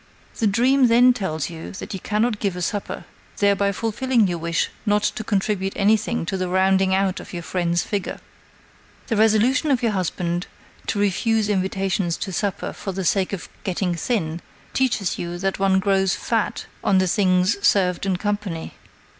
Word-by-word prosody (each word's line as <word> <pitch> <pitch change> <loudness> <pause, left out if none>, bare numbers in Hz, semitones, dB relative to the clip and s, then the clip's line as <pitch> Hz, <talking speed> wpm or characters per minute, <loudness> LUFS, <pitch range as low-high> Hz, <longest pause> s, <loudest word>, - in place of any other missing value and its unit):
The 225 - +3
dream 250 +6 +4
then 245 +2 +6
tells 175 - -2
you 165 -1 -8
that 195 - -7
you 190 - -4
cannot 215 +3 0
give 195 -4 -1
a 180 - -5
supper, 205 +3 -3 0.3
thereby 200 0 +2
fulfilling 230 +2 +1
your 175 -2 -2
wish 170 +1 -1
not 210 -1 +2
to 220 - -1
contribute 195 -2 -1
anything 215 0 +1
to 190 - -2
the 185 -1 -2
rounding 190 +1 +3
out 190 -1 0
of - - -11
your 170 -1 -5
friend's 175 -1 0
figure. 200 -3 -3 0.9
The 225 - +1
resolution 225 +8 +3
of 260 -3 +2
your 230 - +2
husband 175 -2 -2 0.4
to - - -1
refuse 210 +2 +1
invitations 190 -2 0
to 190 - -5
supper 200 0 -2
for 195 - -5
the 190 0 -3
sake 190 +1 +1
of 195 -5 -5 0.2
getting 185 -1 -1
thin 170 -3 -2 0.3
teaches 235 -8 0
you 175 0 -4
that 195 +2 -2
one 195 -1 +3
grows 195 -1 +2
fat 225 -2 -1 0.2
on 195 - +3
the 185 - +3
things 185 +1 +2
served 180 -3 +3
in 185 -2 +1
company." 205 -4 -3
195 Hz, 170 wpm, -22 LUFS, 185-215 Hz, 0.9 s, then